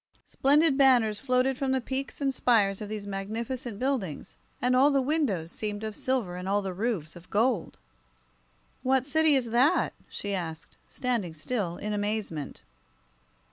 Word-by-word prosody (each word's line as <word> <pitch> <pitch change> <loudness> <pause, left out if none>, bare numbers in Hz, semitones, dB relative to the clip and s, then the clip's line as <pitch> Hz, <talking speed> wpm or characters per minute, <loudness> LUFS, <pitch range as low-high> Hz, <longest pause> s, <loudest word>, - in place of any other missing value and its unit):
Splendid 290 +1 +3
banners 240 -6 +4
floated 255 0 +1
from 270 -1 0
the 265 - +2
peaks 265 +2 -4
and 275 -1 +1
spires 210 -6 +2
of 210 - -5
these 210 -1 -5
magnificent 220 +4 -4
buildings, 250 - -2 0.2
and 250 +1 +2
all 270 +3 +6
the 280 -1 +3
windows 255 - 0
seemed 210 0 -4
of 215 -1 -4
silver 235 -9 -1
and 180 +1 -5
all 205 +1 +1
the 190 -1 -3
roofs 185 -6 -2
of 175 0 -14
gold. 225 -2 +1 1.0
"What 260 0 +2
city 310 +1 +4
is 240 -4 0
that?" 265 +9 +3 0.2
she 205 0 -4
asked, 165 -4 -5
standing 230 -10 -2
still, 175 0 -3
in 210 0 -3
amazement. 205 -8 -3
230 Hz, 155 wpm, -28 LUFS, 195-265 Hz, 1.0 s, all